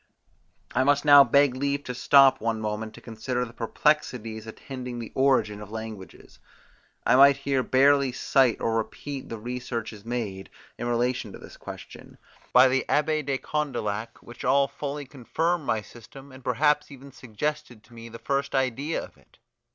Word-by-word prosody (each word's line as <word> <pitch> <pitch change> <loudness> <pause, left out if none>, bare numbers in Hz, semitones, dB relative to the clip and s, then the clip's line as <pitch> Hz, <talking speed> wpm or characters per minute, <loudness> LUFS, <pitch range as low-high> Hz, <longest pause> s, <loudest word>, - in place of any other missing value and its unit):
I 130 - +2
must 145 +2 +2
now 145 -1 +9
beg 140 +1 +3
leave 140 +2 -2
to 125 - -5
stop 135 +1 +5
one 115 0 -1
moment 110 +1 -4
to - - -13
consider 125 +2 -3
the 115 - -12
perplexities 115 -3 -1
attending 125 +2 -7
the 115 -2 -7
origin 125 -6 +2
of 105 - -9
languages. 110 -3 -9 0.7
I - - +4
might 140 +1 +7
here 140 -1 0
barely 135 +1 +3
cite 130 -1 +2
or 115 - -1
repeat 135 +5 -5
the 115 - -5
researches 115 -2 -5
made, 110 -5 -4 0.3
in 120 - -3
relation 120 -2 -1
to - - -8
this - - -13
question, - - -11 0.3
by 125 +1 +7
the 130 +1 +1
Abbe 155 +1 +1
de 140 -2 -2
Condillac, 115 -8 -3
which 120 - -11
all 135 +2 +3
fully 140 +1 -6
confirm 155 +6 -2
my 110 -5 -1
system, 135 +5 -14
and 130 0 -14
perhaps 150 +5 +1
even 140 -1 -12
suggested 130 0 -5
to 120 - -20
me 115 0 -10
the 115 - -9
first 140 +3 -2
idea 135 +4 -1
of - - -13
it. - - -27
130 Hz, 165 wpm, -26 LUFS, 115-140 Hz, 0.7 s, now